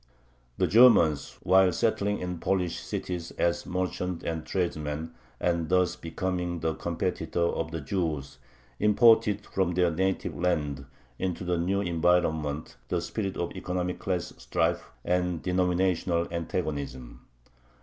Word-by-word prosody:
The - - +3
Germans, 105 - +5
while 95 0 +5
settling 105 +2 +1
in 90 0 -4
the 90 - -5
Polish 90 -2 0
cities 85 -2 -4
as 85 0 0
merchants 90 -1 -2
and 80 -1 -2
tradesmen, 80 -3 -2 0.3
and 85 -2 0
thus 90 -1 +3
becoming 90 0 -3
the 80 0 0
competitors 85 0 -1
of 80 - -2
the 80 -1 -4
Jews, 75 -2 -3 0.4
imported 105 -1 +4
from 90 -2 0
their 90 -1 +3
native 95 +4 -1
land 75 -6 -1 0.3
into 90 -1 -2
the 90 -1 0
new 95 +4 +1
environment 80 -4 0
the - - 0
spirit 100 -3 -3
of 85 - -2
economic 90 0 -3
class 90 -2 -2
strife - - 0 0.2
and 90 -1 0
denominational 90 -1 +1
antagonism. 75 -7 -4
90 Hz, 130 wpm, -28 LUFS, 80-95 Hz, 0.4 s, Germans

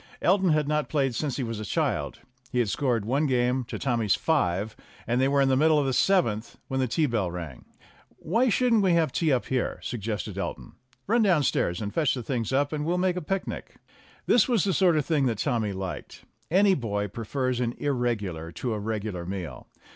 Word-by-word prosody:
Elton 190 0 +3
had 155 -2 +2
not 150 0 0
played 135 -4 +1
since 140 +2 -2
he 135 - -1
was 115 -2 -4
a - - -4
child. 105 - -2 0.3
He - - -2
had 120 -4 +2
scored 120 -4 0
one 140 +6 +1
game 125 0 +1
to - - -6
Tommy's 115 -7 +1
five, 105 - 0 0.3
and 120 +2 +1
they 135 - +4
were 140 0 +3
in 135 - +3
the 130 - +3
middle 155 +3 +4
of 145 - +2
the 135 - 0
seventh 120 - +1
when 130 - -2
the 130 - +1
tea 150 +7 +1
bell 110 -9 0
rang. 85 -7 -7 0.5
"Why 230 +10 +1
shouldn't 235 -1 +3
we 190 -3 +3
have 165 -4 +2
tea 160 +1 +1
up 130 -3 +1
here?" 130 -1 -1
suggested 105 -4 -4
Elton. - - -5 0.3
"Run 230 +4 +2
downstairs 150 - +2
and 100 - -4
fetch 150 -6 +2
the 125 - -5
things 115 -2 -2
up, 140 +3 +1
and 150 -1 -2
we'll 170 +3 0
make 180 0 +1
a 180 - -3
picnic." 190 +5 -4 0.5
This 240 - +4
was 230 -7 +3
the 195 - +1
sort 175 -4 +4
of 150 - 0
thing 150 -5 +2
that 115 -3 -1
Tommy 115 -4 0
liked; 95 -2 -6 0.2
any 195 +3 +4
boy 105 - -2
prefers 125 +4 -2
an 120 -1 -1
irregular 105 - -2
to 120 +7 -3
a 105 - -3
regular 105 -4 -4
meal. 95 -3 -6
130 Hz, 210 wpm, -26 LUFS, 110-155 Hz, 0.5 s, they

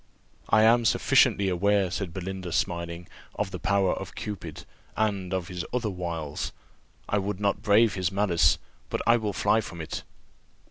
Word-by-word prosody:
"I 110 - +5
am 115 +2 +5
sufficiently 100 -3 +3
aware," 95 +1 +2
said 95 -2 -3
Belinda, 95 0 -5
smiling, 85 0 -2 0.3
"of 95 - -2
the 90 - -5
power 95 +1 +2
of - - -7
Cupid, 85 -7 -6 0.3
and 100 -4 0
of 95 -2 -2
his 90 -2 -4
wiles. 90 -10 -3 0.6
I 105 - +1
would 100 0 -3
not 100 -1 0
brave 110 +1 +4
his 90 -1 -1
malice, 90 -6 +3 0.3
but - - -2
I 115 0 +5
will 110 -3 -2
fly 110 +3 +2
from 85 -5 -9
it." 80 - -5
95 Hz, 155 wpm, -27 LUFS, 85-105 Hz, 0.6 s, I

